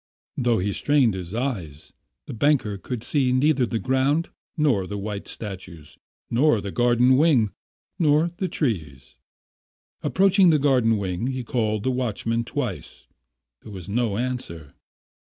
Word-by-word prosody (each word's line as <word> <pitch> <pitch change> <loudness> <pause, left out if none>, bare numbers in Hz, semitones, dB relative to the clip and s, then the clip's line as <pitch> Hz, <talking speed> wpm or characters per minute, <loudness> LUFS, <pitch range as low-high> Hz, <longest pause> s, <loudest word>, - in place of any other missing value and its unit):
Though 120 -3 +1
he 100 +2 -1
strained 140 -4 +2
his 90 +1 -6
eyes, 95 - -4 0.3
the - - -7
banker 115 -5 +1
could 120 +2 -5
see 130 -1 +1
neither 130 0 +2
the 115 - -2
ground, 135 +7 +1 0.3
nor 130 -12 +2
the 105 - -5
white 100 0 -5
statues, 95 -7 -8 0.3
nor 125 -1 +3
the 100 -1 -5
garden 120 +2 +3
wing, 135 -9 +3 0.5
nor 155 +1 +3
the 190 - -1
trees. 80 - -3 0.9
Approaching 195 -1 +4
the 155 - +4
garden 130 -6 +3
wing, 95 +3 -3
he 130 -1 -3
called 110 -3 -1
the 130 - +1
watchman 115 -2 -1
twice. - - -5 0.6
There 110 - -12
was 95 -4 -9
no 110 -1 -1
answer. 115 - -4
120 Hz, 140 wpm, -24 LUFS, 100-135 Hz, 0.9 s, Approaching